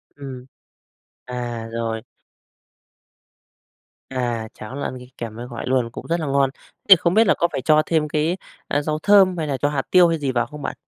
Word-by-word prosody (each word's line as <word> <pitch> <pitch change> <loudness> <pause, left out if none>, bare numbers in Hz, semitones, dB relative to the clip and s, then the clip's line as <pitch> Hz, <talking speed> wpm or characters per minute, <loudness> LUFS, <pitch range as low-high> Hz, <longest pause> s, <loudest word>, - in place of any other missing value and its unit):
Ừm. 130 -3 -8 0.8
À, 120 -2 -5
rồi. 115 -1 -3 2.1
À, 120 -4 -2
cháo 110 +5 -9
là 140 - -4
ăn 130 - -6
đi 125 0 -12
kèm 115 -2 -6
với 120 +1 -7
gỏi 120 -2 -6
luôn, 125 -3 +1
cũng - - -8
rất 170 +1 0
là 160 - -2
ngon. 140 -1 +2
Thế - - -30 0.3
thì 190 - +12
không 170 +1 0
biết 220 0 +5
là - - +6
có 170 - +2
phải - - -3
cho 155 +2 +4
thêm 155 -2 +1
cái, 155 +4 0 0.3
a, 145 - +1
rau 155 +1 -2
thơm 195 -3 +5
hay 155 - -2
là 135 -2 -1
cho 145 - +1
hạt 140 -2 -1
tiêu 180 -2 +7
hay 165 -1 0
gì 140 -3 -1
vào 120 -2 +1
không 150 +2 -10
bạn? - - -4
140 Hz, 215 wpm, -22 LUFS, 120-160 Hz, 2.1 s, thì